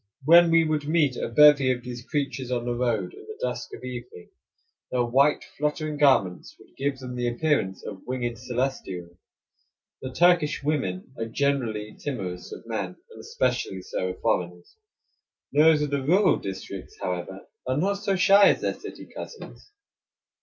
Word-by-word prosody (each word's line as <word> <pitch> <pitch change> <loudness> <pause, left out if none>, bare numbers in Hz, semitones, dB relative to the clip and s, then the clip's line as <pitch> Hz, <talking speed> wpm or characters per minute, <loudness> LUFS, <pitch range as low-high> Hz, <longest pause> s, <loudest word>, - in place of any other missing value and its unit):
When 170 +2 +7
we 165 0 +5
would 155 -2 -1
meet 155 -5 +2
a - - -3
bevy 140 +1 +6
of 125 -1 -3
these 120 -1 -7
creatures 135 -3 -3
on 120 -2 -1
the 120 - -1
road 115 -7 -1
in - - -12
the 435 0 -9
dusk - - -3
of - - -14
evening, 120 -8 -8 0.6
their 125 -1 +1
white, 135 +5 +3
fluttering 150 +1 -3
garments 130 -11 +2
would - - -21
give 140 0 -1
them 125 -1 -7
the 120 -1 -1
appearance 120 -6 0
of 95 -2 -7
winged 120 -3 -3
celestials. 120 -9 -3 0.9
The 130 - -5
Turkish 170 0 +3
women 130 -9 -2
are 115 - -2
generally 115 -5 -1
timorous 95 -11 -5
of - - -9
men, - - -4 0.2
and - - -12
especially 95 -1 -2
so 95 - -3
of 90 - -8
foreigners. 90 0 -2 0.8
Those 150 0 +5
of 145 - -3
the 140 -1 0
rural 185 +8 +4
districts, 95 -1 -7
however, 90 +1 -4 0.2
are 130 +1 0
not 200 +5 0
so 200 -1 0
shy 195 +2 +6
as - - +1
their - - 0
city - - -10
cousins. 455 - -10
130 Hz, 165 wpm, -26 LUFS, 115-150 Hz, 0.9 s, When